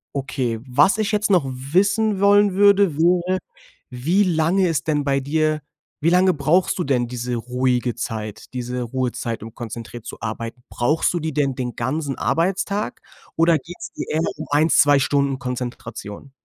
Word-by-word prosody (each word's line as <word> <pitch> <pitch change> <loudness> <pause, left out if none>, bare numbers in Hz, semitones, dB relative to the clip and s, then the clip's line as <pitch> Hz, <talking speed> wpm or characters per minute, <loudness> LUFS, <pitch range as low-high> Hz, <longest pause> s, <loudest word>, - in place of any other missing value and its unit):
Okay. 130 -4 -2
Was 140 - +3
ich 215 0 0
jetzt 210 0 +1
noch 180 -6 +4
wissen 195 +9 +1
wollen 205 -1 +5
würde, 200 -4 +4
wäre, 180 +2 +2 0.5
wie 160 +11 +1
lange 175 +2 +2
ist 155 -2 -2
denn 150 -2 +1
bei 140 -1 +1
dir 155 +2 0 0.4
wie 165 - +3
lange 180 +1 +4
brauchst 155 +6 +2
du 180 - 0
denn 125 -3 0
diese 125 0 -4
ruhige 125 0 -1
Zeit, 110 -2 -6
diese 125 0 -3
Ruhezeit, 120 -2 -3
um 115 0 -10
konzentriert 115 0 -8
zu - - -7
arbeiten. 115 +2 -5
Brauchst 145 +7 +1
du 175 - -1
die 160 -1 -3
denn 140 -3 0
den 125 -2 -4
ganzen 135 +3 -2
Arbeitstag? 195 +4 -1 0.3
Oder 165 0 +4
geht's 170 +5 -9
eher 155 - -2 0.2
um 155 - -6
1, 155 +3 +3
2 145 -1 +5
Stunden 140 -1 +1
Konzentration? 125 -2 -6
145 Hz, 160 wpm, -21 LUFS, 125-175 Hz, 0.5 s, wollen